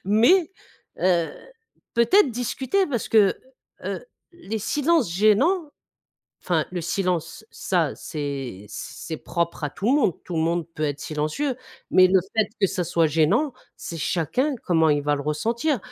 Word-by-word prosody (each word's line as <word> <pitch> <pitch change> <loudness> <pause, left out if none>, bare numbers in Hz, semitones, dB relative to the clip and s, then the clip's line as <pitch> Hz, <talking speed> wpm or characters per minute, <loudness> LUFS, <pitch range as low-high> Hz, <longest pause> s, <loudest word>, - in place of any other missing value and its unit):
Mais 240 - +4 0.5
heu, 170 -4 +2 0.6
peut-être 270 - +4
discuter, 260 - 0
parce 245 -7 -3
que, 210 -4 +5 0.5
heu, - - -4 0.3
les 225 - -5
silences 295 - +1
gênants, 270 - +3 0.7
enfin, 165 -4 0
le 180 - -2
silence, 175 +2 -2
ça, 170 -6 0
c'est, 135 -9 -5
c - - -7
c'est 160 - -5
propre 170 -2 -3
à 145 - -1
tout 200 +8 -5
le 250 - +4
monde 185 - +2
tout 175 - -6
le 160 - +2
monde 170 0 0
peut 155 - -5
être 145 -2 -1
silencieux, 155 - -2 0.4
mais 185 0 +7
le 190 - +5 0.2
fait 220 -2 +3
que 195 - +5
ça 190 -1 -2
soit 165 -1 +2
gênant, 165 - +2 0.2
c'est 170 - -7
chacun 240 - 0
comment 160 -3 +3
il 145 -1 +2
va 145 0 +1
le 140 - -4
ressentir. 235 - 0
185 Hz, 160 wpm, -24 LUFS, 160-245 Hz, 0.7 s, mais